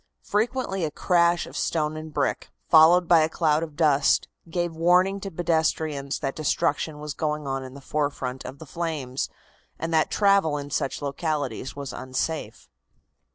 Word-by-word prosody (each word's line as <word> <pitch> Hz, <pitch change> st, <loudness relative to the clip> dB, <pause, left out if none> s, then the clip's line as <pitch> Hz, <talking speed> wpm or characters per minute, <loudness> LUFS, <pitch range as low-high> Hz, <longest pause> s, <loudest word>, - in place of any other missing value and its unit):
Frequently 215 Hz, -3 st, -1 dB
a 155 Hz, -, 0 dB
crash 170 Hz, +2 st, +2 dB
of -, -, -12 dB
stone 155 Hz, -2 st, -1 dB
and 155 Hz, 0 st, -7 dB
brick, 145 Hz, -2 st, -1 dB, 0.2 s
followed 170 Hz, +2 st, +6 dB
by 170 Hz, -1 st, +6 dB
a 155 Hz, 0 st, +2 dB
cloud 155 Hz, -2 st, +1 dB
of 160 Hz, -3 st, -6 dB
dust, 150 Hz, -3 st, +3 dB, 0.2 s
gave 175 Hz, 0 st, -1 dB
warning 180 Hz, +4 st, +3 dB
to 195 Hz, -, -5 dB
pedestrians 160 Hz, -4 st, 0 dB
that 135 Hz, -2 st, -3 dB
destruction 150 Hz, 0 st, 0 dB
was 150 Hz, -1 st, -5 dB
going 150 Hz, -1 st, -2 dB
on 135 Hz, -1 st, -2 dB
in 130 Hz, 0 st, -10 dB
the 140 Hz, -, -10 dB
forefront 135 Hz, -3 st, -2 dB
of 135 Hz, -, -8 dB
the 160 Hz, -, -10 dB
flames, 150 Hz, -5 st, -3 dB, 0.5 s
and 165 Hz, +1 st, -3 dB
that 155 Hz, -1 st, +3 dB
travel 195 Hz, -7 st, +3 dB
in 145 Hz, 0 st, -6 dB
such 135 Hz, +2 st, -2 dB
localities 140 Hz, -4 st, -3 dB
was 140 Hz, -2 st, -6 dB
unsafe. 130 Hz, +5 st, -4 dB
155 Hz, 160 wpm, -25 LUFS, 140-170 Hz, 0.5 s, followed